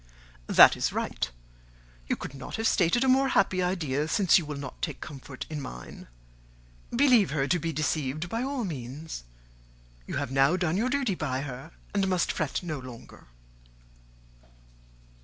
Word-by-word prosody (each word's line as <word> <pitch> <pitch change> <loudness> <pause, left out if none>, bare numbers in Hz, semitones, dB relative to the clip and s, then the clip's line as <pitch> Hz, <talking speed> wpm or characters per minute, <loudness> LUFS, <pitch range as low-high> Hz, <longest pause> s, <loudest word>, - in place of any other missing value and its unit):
"That - - +8
is - - 0
right. - - -2 0.8
You - - +1
could - - -7
not 135 -1 -7
have 225 0 +1
started 185 +7 +3
a - - +1
more 265 +1 +4
happy 195 -5 +2
idea, 155 -6 0
since 190 +1 +4
you 160 - -7
will 150 -1 -4
not 140 -2 -8
take 150 -5 -3
comfort 140 -2 -8
in 150 -2 -5
mine: 60 - -9 0.8
believe 245 -5 +4
her 140 -1 0
to 175 - +2
be 165 0 -2
deceived, 155 0 -1
by 225 +6 -2
all 265 -2 -2
means. 140 - -6 0.8
You - - -4
have 140 -2 -3
now 135 +6 +4
done 175 -2 0
your 230 +6 +1
duty 265 -6 +1
by 135 -6 -2
her, 135 +2 -7 0.2
and 200 -1 +1
must 185 -2 +1
fret 155 +1 -2
no 155 -5 -4
longer." 125 - -12
160 Hz, 160 wpm, -28 LUFS, 140-195 Hz, 0.8 s, That